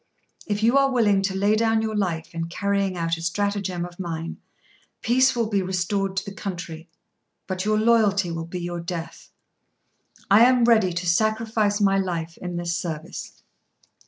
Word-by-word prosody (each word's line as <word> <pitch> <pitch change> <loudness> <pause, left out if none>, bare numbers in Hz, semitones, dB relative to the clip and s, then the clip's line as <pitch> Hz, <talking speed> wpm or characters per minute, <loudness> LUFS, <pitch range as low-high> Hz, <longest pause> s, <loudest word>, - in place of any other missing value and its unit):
If 205 0 -1
you 240 +5 +5
are 275 0 +3
willing 210 -6 +3
to 195 0 -1
lay 200 +2 +2
down 225 0 +2
your 220 -1 -2
life 175 -6 -2
in 165 0 -3
carrying 200 +1 -1
out 165 -1 -1
a - - -8
stratagem 190 0 -1
of 175 0 -12
mine, 165 -2 -4 0.7
peace 260 +2 +3
will 235 -1 +1
be 205 -2 0
restored 190 +1 -1
to - - -1
the 200 - -7
country; 170 -5 -6 0.6
but 185 0 -3
your 215 0 +2
loyalty 215 -5 +3
will 165 0 -4
be 180 +1 -5
your 175 0 -4
death." 170 -1 -6 1.0
"I 210 +3 +8
am 250 -1 +4
ready 220 -6 +4
to 175 +1 -3
sacrifice 215 +2 +1
my 195 -1 +3
life 170 -3 -3
in 180 -1 -5
this 170 0 -2
service." 160 -3 -6
195 Hz, 170 wpm, -24 LUFS, 175-215 Hz, 1.0 s, I